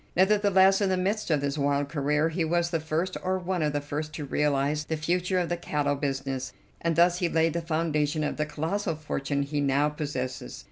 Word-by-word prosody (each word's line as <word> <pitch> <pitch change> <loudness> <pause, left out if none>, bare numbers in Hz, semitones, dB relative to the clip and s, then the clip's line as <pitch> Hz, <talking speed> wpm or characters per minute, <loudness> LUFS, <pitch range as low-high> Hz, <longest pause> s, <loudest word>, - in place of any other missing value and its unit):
Nevertheless, 195 0 +4
in 200 - +2
the 185 - +1
midst 200 +3 -1
of 150 -3 +2
this 140 +1 -2
wild 140 0 +1
career 150 +1 +1
he 165 +1 -1
was 170 +1 +1
the 165 - +1
first, 160 +4 -2
or 185 +1 +1
one 180 -1 -2
of 150 -1 +1
the 145 - -1
first, 150 +2 -4
to 150 - -4
realize 145 +1 0
the 160 - -2
future 180 +4 0
of 180 -2 +1
the 175 - -1
cattle 145 -4 -1
business, 135 -2 -3 0.3
and 165 -1 0
thus 175 +1 +4
he 175 - +1
laid 165 -1 +2
the 170 - -1
foundation 155 -2 0
of - - -2
the 150 0 -1
colossal 165 +4 -2
fortune 140 -2 -2
he 145 +1 -2
now 140 +1 +2
possesses. 135 -4 -4
155 Hz, 215 wpm, -27 LUFS, 145-175 Hz, 0.3 s, Nevertheless